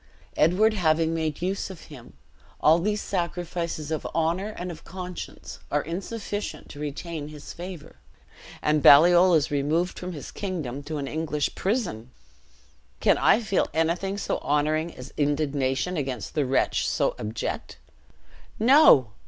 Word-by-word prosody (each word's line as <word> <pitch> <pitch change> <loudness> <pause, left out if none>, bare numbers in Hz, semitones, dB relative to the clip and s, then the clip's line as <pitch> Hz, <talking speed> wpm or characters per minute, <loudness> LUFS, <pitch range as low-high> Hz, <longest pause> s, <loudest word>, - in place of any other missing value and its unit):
Edward 195 +8 +4
having 165 -4 +2
made 160 -1 -2
use 195 +2 -2
of 185 -4 -10
him, 125 - -13 0.5
all 160 +2 +5
these 210 +4 -1
sacrifices 170 -3 -3
of 155 - -2
honor 170 +5 0
and 180 0 -4
of 160 - -11
conscience 180 0 -8
are 145 0 +1
insufficient 205 +5 -5
to 145 - -10
retain 150 +1 -5
his 150 -1 -10
favor; 175 -2 -9 0.7
and 150 0 +2
Baliol 175 +5 +7
is 150 -3 +1
removed 150 +5 0
from 180 0 -5
his 145 - -8
kingdom 155 -10 -4
to 155 0 -4
an 140 -1 -3
English 150 -1 -2
prison! 190 - -2 0.9
Can - - +3
I 225 - +4
feel 200 -4 +1
anything 175 +5 0
so - - -2
honoring 155 +3 0
as 125 +1 -10
indignation 145 +2 0
against 130 -6 -4
a 145 -4 +1
wretch 135 - +1
so - - +1
abject? 110 +2 -4 0.8
No! 225 - +6
160 Hz, 140 wpm, -26 LUFS, 145-180 Hz, 0.9 s, Baliol